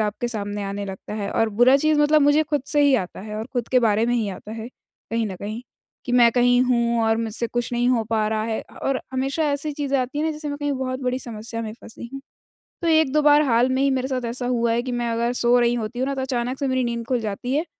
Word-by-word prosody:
आपके 215 Hz, +3 st, -1 dB
सामने 205 Hz, -3 st, -3 dB
आने 200 Hz, +1 st, -4 dB
लगता 195 Hz, +1 st, -7 dB
है 205 Hz, -2 st, -3 dB
और 225 Hz, -, +1 dB
बुरा 255 Hz, +3 st, +7 dB
चीज़ 310 Hz, +1 st, +2 dB
मतलब 300 Hz, 0 st, +4 dB
मुझे 290 Hz, +2 st, +4 dB
खुद 295 Hz, -3 st, -1 dB
से 295 Hz, 0 st, +2 dB
ही 285 Hz, -2 st, +5 dB
आता 185 Hz, -8 st, -2 dB
है 210 Hz, +2 st, -7 dB
और 220 Hz, +1 st, -4 dB
खुद 245 Hz, -3 st, -2 dB
के 255 Hz, -, +4 dB
बारे 220 Hz, 0 st, +2 dB
में 240 Hz, -, +1 dB
ही 225 Hz, -4 st, 0 dB
आता 200 Hz, +2 st, -8 dB
है 225 Hz, +1 st, -6 dB, 0.4 s
कहीं 230 Hz, 0 st, 0 dB
न 190 Hz, -3 st, -6 dB
कहीं, 215 Hz, +5 st, -6 dB, 0.4 s
कि 245 Hz, -, -4 dB
मैं 240 Hz, -1 st, +6 dB
कहीं 245 Hz, 0 st, +4 dB
हूँ 235 Hz, -2 st, +1 dB
और 225 Hz, 0 st, +2 dB
मुझसे 225 Hz, +1 st, -2 dB
कुछ 240 Hz, +1 st, -3 dB
नहीं 240 Hz, +1 st, +1 dB
हो 240 Hz, -3 st, +2 dB
पा 220 Hz, -1 st, +1 dB
रहा 215 Hz, 0 st, -1 dB
है 225 Hz, -1 st, -2 dB
अ, -, -, -17 dB
और 270 Hz, -1 st, -2 dB
हमेशा 270 Hz, +4 st, -1 dB
ऐसी 285 Hz, +2 st, -2 dB
चीज़ें 280 Hz, -1 st, -1 dB
आती 260 Hz, +3 st, -2 dB
हैं 305 Hz, -, 0 dB
ना 320 Hz, -, +1 dB
जैसे 300 Hz, 0 st, -6 dB
मैं 285 Hz, -, -3 dB
कहीं 290 Hz, -1 st, -1 dB
बहुत 260 Hz, -1 st, -3 dB
बड़ी 255 Hz, 0 st, -1 dB
समस्या 230 Hz, -1 st, -6 dB
में 215 Hz, -, -5 dB
फँसी 235 Hz, +1 st, -10 dB
हूँ। 275 Hz, -, -6 dB, 0.6 s
तो 335 Hz, -, -1 dB
1-2 310 Hz, -2 st, +3 dB
बार 295 Hz, 0 st, +6 dB
हाल 245 Hz, -1 st, +3 dB
में 260 Hz, +1 st, +1 dB
ही 275 Hz, -, +3 dB
मेरे 260 Hz, -1 st, 0 dB
साथ 255 Hz, -2 st, -2 dB
ऐसा 245 Hz, +2 st, -4 dB
हुआ 235 Hz, -2 st, +1 dB
है 235 Hz, +1 st, +1 dB
कि 255 Hz, -, -4 dB
मैं 240 Hz, -1 st, -1 dB
अगर 235 Hz, +1 st, 0 dB
सो 245 Hz, 0 st, +3 dB
रही 240 Hz, 0 st, +3 dB
होती 235 Hz, +1 st, -4 dB
हूँ 260 Hz, -, 0 dB
ना 275 Hz, -, -2 dB
तो 265 Hz, -, -3 dB
अचानक 255 Hz, 0 st, -2 dB
से 275 Hz, -, 0 dB
मेरी 260 Hz, -1 st, +1 dB
नींद 235 Hz, -1 st, -3 dB
खुल 250 Hz, -1 st, +1 dB
जाती 220 Hz, +3 st, -3 dB
है 310 Hz, +3 st, 0 dB
245 Hz, 275 wpm, -23 LUFS, 225-270 Hz, 0.6 s, बुरा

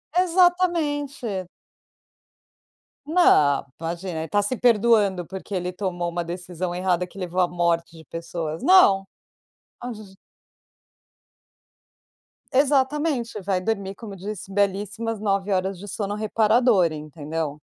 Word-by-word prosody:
Exatamente. 330 Hz, -, +1 dB, 1.6 s
Não, 220 Hz, -, +4 dB
imagina, 170 Hz, +1 st, -4 dB
ele 160 Hz, -, -4 dB
tá 205 Hz, +6 st, +2 dB
se 220 Hz, +5 st, -2 dB
perdoando 210 Hz, -6 st, +3 dB
porque 190 Hz, +4 st, -8 dB
ele 180 Hz, 0 st, -2 dB
tomou 180 Hz, -2 st, -3 dB
uma 175 Hz, 0 st, -3 dB
decisão 175 Hz, +1 st, -5 dB
errada 180 Hz, -1 st, 0 dB
que 190 Hz, -, -17 dB
levou 180 Hz, 0 st, -3 dB
à 180 Hz, -, +3 dB
morte 170 Hz, -1 st, -1 dB
de 160 Hz, -, -14 dB
pessoas. 165 Hz, +1 st, -5 dB
Não. 205 Hz, -, +6 dB, 0.7 s
Aonde 240 Hz, -3 st, -6 dB
a -, -, -10 dB
ge 190 Hz, -1 st, -17 dB, 2.4 s
Exatamente, 270 Hz, -3 st, +1 dB
vai 190 Hz, -1 st, 0 dB
dormir, 195 Hz, 0 st, -2 dB
como 215 Hz, -2 st, -9 dB
eu -, -, -9 dB
disse, 195 Hz, 0 st, -7 dB
belíssimas 205 Hz, +3 st, -1 dB
9 200 Hz, -1 st, 0 dB
horas 190 Hz, 0 st, 0 dB
de 195 Hz, -, -10 dB
sono 205 Hz, 0 st, -3 dB
reparador, 215 Hz, -3 st, +3 dB
entendeu? 155 Hz, 0 st, -5 dB
195 Hz, 120 wpm, -24 LUFS, 175-230 Hz, 2.4 s, Não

